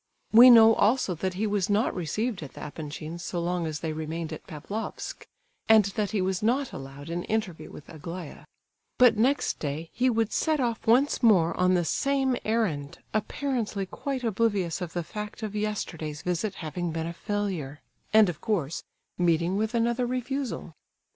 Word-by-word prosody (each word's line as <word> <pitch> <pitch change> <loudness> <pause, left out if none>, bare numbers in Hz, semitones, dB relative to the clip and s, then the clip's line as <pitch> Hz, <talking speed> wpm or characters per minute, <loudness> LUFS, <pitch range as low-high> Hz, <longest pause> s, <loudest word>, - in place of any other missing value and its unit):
We 240 +3 +10
know 225 -2 +9
also 220 -2 +2
that 185 +2 -3
he 210 +4 -1
was 205 -2 0
not 210 +4 +2
received 200 +5 -2
at 145 - -8
the - - -10
Epanchins' 155 +2 -7
so 175 - -3
long 175 0 -1
as 155 -2 -4
they 160 -2 -2
remained 160 +1 -4
at 155 - -9
Pavlofsk, 200 +9 -6 0.4
and 220 -2 +7
that 210 -3 -1
he 205 -3 0
was 185 -1 -1
not 250 +5 +1
allowed 135 +3 -8
an 175 +1 -2
interview 215 -6 -2
with 150 - -12
Aglaya;—but 170 - -2
next 260 +7 +1
day 155 +3 -4
he 255 +1 +2
would 225 -2 0
set 315 -1 +1
off 235 -4 -2
once 255 +6 +4
more 190 -9 +4
on 180 0 +3
the 175 -1 +1
same 270 +4 +1
errand, 170 -10 -1 0.2
apparently 215 -2 -2
quite 265 +6 -4
oblivious 205 -6 0
of 175 -2 -5
the 175 - -2
fact 210 +5 -7
of 210 -1 -4
yesterday's 165 -8 -3
visit 180 +3 -1
having 170 +1 -4
been 160 0 -3
a 170 - -4
failure,—and, 200 +1 0
of 170 -3 -4
course, 170 -9 -1 0.4
meeting 170 +1 +2
with 220 +3 -1
another 235 +1 +1
refusal. 255 - -3
195 Hz, 165 wpm, -27 LUFS, 165-225 Hz, 0.4 s, We